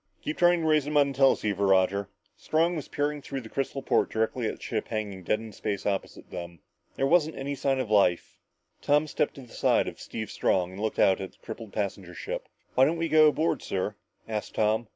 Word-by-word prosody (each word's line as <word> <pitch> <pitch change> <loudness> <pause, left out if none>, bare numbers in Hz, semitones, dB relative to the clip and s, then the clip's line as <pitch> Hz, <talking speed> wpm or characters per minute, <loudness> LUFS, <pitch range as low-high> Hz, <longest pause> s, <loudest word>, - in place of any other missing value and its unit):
"Keep 155 - -4
trying 175 -1 +5
to 160 - 0
raise 155 -2 +3
them 150 0 0
on 140 -1 +4
the 135 - -10
teleceiver, 105 -7 +3
Roger." 95 +1 +3 0.3
Strong 165 +3 +1
was 150 - -5
peering 145 0 -2
through 135 -1 -5
a - - -9
crystal 135 +1 -3
port - - +2
directly 110 +1 -1
at - - -3
the - - -22
ship - - -2
hanging 105 -4 -4
dead 105 +4 0
in 110 -1 -9
space 100 -3 -3
opposite 100 -2 -3
them. 85 -1 -7 0.4
There 135 - +1
wasn't 155 +1 +3
any 140 +1 -3
sign 135 -1 0
of 120 -5 -3
life. 95 -5 +2 0.4
Tom 150 +1 +3
stepped 150 -1 -1
to 140 - -9
the 125 - -14
side - - +2
of - - -7
Steve - - -6
Strong 90 -1 +1
and 95 +2 -8
looked 110 0 -2
out 95 0 +4
at 95 - -6
the - - -26
crippled 110 -2 -8
passenger 95 -4 -4
ship. - - -5 0.2
"Why 130 - +5
don't 160 +4 +1
we 165 0 -1
go 155 0 +7
aboard, 155 +2 +1
sir?" 95 +2 -2 0.3
asked 110 -2 -4
Tom. 110 +1 +1
115 Hz, 225 wpm, -28 LUFS, 100-145 Hz, 0.4 s, go